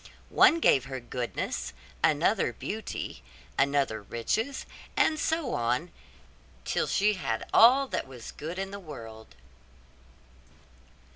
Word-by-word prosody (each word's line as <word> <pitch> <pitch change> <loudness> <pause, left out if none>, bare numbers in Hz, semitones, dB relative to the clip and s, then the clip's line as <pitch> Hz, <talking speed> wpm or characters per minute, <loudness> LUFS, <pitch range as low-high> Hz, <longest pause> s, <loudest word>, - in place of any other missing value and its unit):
One 335 - +6
gave 135 - +4
her 130 -1 -5
goodness, 120 0 -4 0.3
another - - +3
beauty, - - -5 0.3
another 135 -5 +1
riches, 220 - -2 0.3
and 310 -1 +3
so 320 -5 0
on 125 +9 0 0.7
till - - 0
she 210 +1 +3
had 115 - -3
all 260 +4 +7
that - - -2
was 125 -4 -9
good 165 +4 -6
in 195 0 -3
the 200 - -6
world. 115 - -10
145 Hz, 115 wpm, -28 LUFS, -, 0.7 s, all